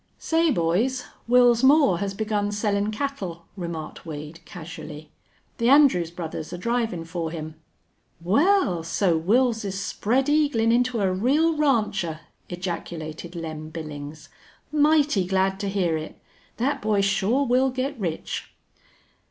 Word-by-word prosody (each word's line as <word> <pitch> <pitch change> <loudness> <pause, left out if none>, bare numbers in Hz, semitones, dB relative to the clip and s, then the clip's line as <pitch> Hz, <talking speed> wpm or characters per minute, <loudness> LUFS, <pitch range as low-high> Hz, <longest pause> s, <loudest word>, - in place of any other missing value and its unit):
"Say, 330 0 +1
boys, 230 - +1 0.2
Wils 245 -1 +5
Moore 270 - +5
has 200 -1 -3
begun 210 -1 -1
sellin' 205 0 0
cattle," 210 -9 -4
remarked 170 -4 -6
Wade, 155 0 -8
casually. 155 -3 -9 0.5
"The 235 +1 +3
Andrews 265 - +5
brothers 165 -2 -6
are 175 - -5
drivin' 225 -4 -1
for 165 -1 -4
him." 160 -1 -6 0.7
"Wal, 205 - +2
so 170 +2 +1
Wils's 215 0 +1
spread 245 +6 0
eaglin' 290 -7 +2
into 245 -1 +1
a 190 -2 +1
real 290 - +2
rancher!" 210 - 0 0.3
ejaculated 170 -2 -6
Lem 155 -2 -6
Billings. 155 -1 -8 0.4
"Mighty 295 -7 +3
glad 190 0 +1
to 200 - -2
hear 185 -5 0
it. 155 0 -8 0.4
Thet 265 +5 0
boy 210 -1 +2
shore 200 +7 +1
will 260 +1 +3
git 260 +2 -3
rich." 170 -5 -4
200 Hz, 125 wpm, -24 LUFS, 170-250 Hz, 0.7 s, Wils